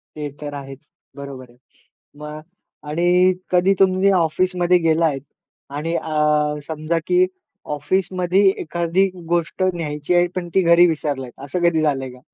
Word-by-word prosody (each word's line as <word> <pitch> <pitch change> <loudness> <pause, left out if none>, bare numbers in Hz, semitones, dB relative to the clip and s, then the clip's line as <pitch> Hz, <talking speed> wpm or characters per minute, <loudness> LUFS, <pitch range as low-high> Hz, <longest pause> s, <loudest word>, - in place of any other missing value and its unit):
ते 150 -1 -4
तर 145 -1 -6
आहेच. 135 +1 -10 0.3
बरोबर 135 -3 -9
आहे. 120 - -22 0.6
मग 150 0 -7 0.5
आणि 170 +3 -1 0.5
कधी 180 +2 +4
तुम्ही 190 +1 +4
ऑफिसमध्ये 180 +2 +2
गेला 165 0 +2
आहे 140 -4 0 0.6
आणि 165 +3 -3
अ, 150 -1 +1
समजा 160 +1 -2
की 360 +1 +4 0.5
ऑफिसमध्ये 185 +4 0 0.2
एखादी 170 +4 0 0.2
गोष्ट 175 +2 0
न्यायची 150 -1 -3
आहे, 175 0 +4
पण 175 -1 -3
ती 190 - +5
घरी 170 0 +6
विसरलात 145 -5 -3
असं 175 +5 -3
कधी 160 -2 0
झालंय 135 -4 0
का? 125 - -14
160 Hz, 140 wpm, -20 LUFS, 150-175 Hz, 0.6 s, घरी